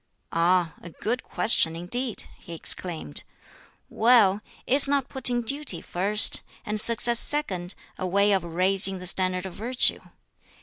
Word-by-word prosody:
"Ah! 170 -1 0
a 170 - -11
good 235 +9 -5
question 165 -7 0
indeed!" 225 +8 0 0.2
he 170 - -12
exclaimed. 165 - -6 0.6
"Well, 215 -4 +2 0.2
is 275 +2 +3
not 275 -2 -2
putting 245 -2 +2
duty 275 - -1
first, 205 +4 +3 0.2
and 210 0 -2
success 235 +1 +4
second, 190 -12 +3 0.2
a 185 - -4
way 200 +3 +1
of 195 -2 0
raising 190 +3 0
the 180 - -10
standard 185 0 0
of 190 - -9
virtue? 240 +6 +1
195 Hz, 135 wpm, -23 LUFS, 180-240 Hz, 0.6 s, success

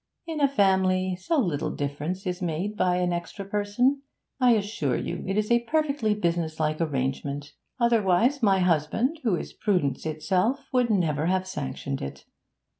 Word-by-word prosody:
'In 320 -3 -4
a 280 - +6
family, 190 -6 +2
so 190 - -1
little 175 - 0
difference 150 +7 -4
is 180 0 -3
made 180 +5 -2
by 180 -3 +2
an 180 -1 +1
extra 175 +3 -5
person. 210 +7 +1 0.4
I 250 -2 +5
assure 200 - 0
you - - -4
it 195 +2 -1
is 215 +1 0
a 235 0 +5
perfectly 280 -6 +1
businesslike 160 -4 -1
arrangement; 140 0 -2 0.3
otherwise 235 +3 +3
my 195 -4 +4
husband, 180 - +1
who 220 -7 +2
is - - -6
prudence 180 -8 0
itself, 185 - 0
would 250 -2 +3
never 165 -7 +1
have 185 +1 +1
sanctioned 140 -5 -4
it. 70 0 -7
185 Hz, 155 wpm, -26 LUFS, 160-225 Hz, 0.4 s, a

